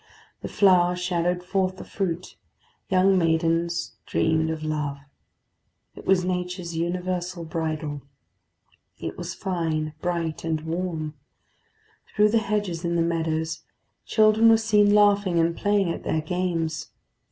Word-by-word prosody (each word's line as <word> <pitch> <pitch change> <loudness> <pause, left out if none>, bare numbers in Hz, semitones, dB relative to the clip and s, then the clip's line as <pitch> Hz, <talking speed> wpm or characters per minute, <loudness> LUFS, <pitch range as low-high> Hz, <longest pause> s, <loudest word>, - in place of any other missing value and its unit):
The - - -4
flower 180 -3 +4
shadowed 180 0 -1
forth 185 0 -1
the - - -8
fruit; 180 -3 -4 0.5
young 190 0 +4
maidens 165 +1 0
dreamed 160 0 +1
of 160 -1 -4
love. 150 -2 -2 1.0
It - - -12
was 185 -1 +3
nature's 180 -1 -3
universal 180 +1 -2
bridal. 155 -2 -3 1.0
It - - -5
was - - -6
fine, 160 -4 -2
bright, 170 -3 -2
and 160 -1 -1
warm; 160 -2 -3 1.0
through 210 0 +5
the 225 +1 +3
hedges 205 -5 -2
in 170 0 -1
the 170 - +2
meadows 160 -1 -1 0.4
children 215 +1 +4
were 225 - +7
seen 210 -2 +3
laughing 205 -3 +4
and 165 0 +2
playing 205 -3 +1
at - - -5
their 155 - 0
games. 165 -1 -2
175 Hz, 130 wpm, -25 LUFS, 160-185 Hz, 1.0 s, were